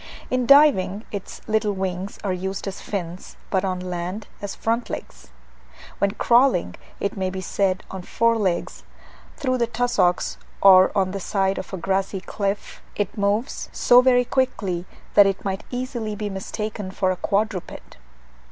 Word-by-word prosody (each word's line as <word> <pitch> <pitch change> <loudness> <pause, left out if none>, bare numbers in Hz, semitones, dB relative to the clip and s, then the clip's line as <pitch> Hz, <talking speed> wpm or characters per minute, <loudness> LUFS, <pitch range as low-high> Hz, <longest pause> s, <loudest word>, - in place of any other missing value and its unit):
In 255 -1 +1
diving, 245 -9 +5
its 200 -3 -7
little 215 -1 +1
wings 190 0 -4
are 195 -3 0
used 190 +2 -4
as 195 - -5
fins; 180 -3 -6
but 190 -1 +1
on 185 -1 -1
the 180 - -7
land, 180 +4 -4 0.2
as 205 -1 -5
front 230 +1 -1
legs. - - -7 0.7
When 200 - +3
crawling, 235 - +3 0.3
it 200 - -2
may 190 -2 -1
be 190 0 -5
said 185 0 0
on 190 - -5
four 230 +5 +2
legs, 190 -6 -1 0.6
through 255 -4 0
the 235 - +2
tussocks 235 -6 +1 0.2
or 185 -1 +7
on 190 -1 +2
the 195 - -4
side 195 0 0
of - - -8
a 190 - -4
grassy 190 +2 -1
cliff, 200 +1 -4
it 205 -2 -2
moves 205 +5 -1
so 245 0 +6
very 250 -1 +4
quickly 200 -9 -1 0.3
that 205 -1 +7
it 195 0 -2
might 195 0 -3
easily 245 -4 -3
be 210 -1 -4
mistaken 205 +1 -4
for 185 0 0
a - - -1
quadruped. 200 - -2
200 Hz, 160 wpm, -23 LUFS, 185-225 Hz, 0.7 s, or